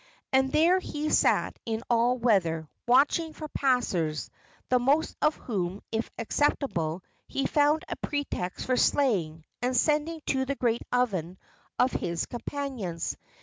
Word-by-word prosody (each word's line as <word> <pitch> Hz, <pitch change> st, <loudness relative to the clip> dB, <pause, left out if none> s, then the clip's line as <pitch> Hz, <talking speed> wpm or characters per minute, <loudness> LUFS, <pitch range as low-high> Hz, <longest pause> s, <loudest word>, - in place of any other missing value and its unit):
And 265 Hz, 0 st, +3 dB
there 340 Hz, +6 st, +4 dB
he 305 Hz, -3 st, -3 dB
sat -, -, +2 dB
in 225 Hz, 0 st, -3 dB
all 240 Hz, +1 st, +3 dB
weather, 175 Hz, -10 st, +1 dB, 0.2 s
watching 295 Hz, +6 st, +3 dB
for 310 Hz, -, -7 dB
passers, 195 Hz, -, 0 dB, 0.4 s
the 250 Hz, -, +4 dB
most 280 Hz, +6 st, +2 dB
of 305 Hz, 0 st, +3 dB
whom, 195 Hz, -4 st, -3 dB
if 225 Hz, +1 st, -2 dB
acceptable, 205 Hz, -, 0 dB, 0.2 s
he 275 Hz, -, -2 dB
found 295 Hz, +1 st, +3 dB
a -, -, -3 dB
pretext 285 Hz, -11 st, -3 dB
for 255 Hz, -1 st, +1 dB
slaying 175 Hz, -, +1 dB, 0.2 s
and 250 Hz, +1 st, +1 dB
sending 305 Hz, +4 st, +1 dB
to 265 Hz, -1 st, +1 dB
the 280 Hz, +1 st, -2 dB
great 235 Hz, -3 st, 0 dB
oven 190 Hz, -8 st, 0 dB, 0.4 s
of 250 Hz, -, +3 dB
his 170 Hz, -1 st, -2 dB
companions. 240 Hz, -, -4 dB
250 Hz, 140 wpm, -28 LUFS, 190-285 Hz, 0.4 s, there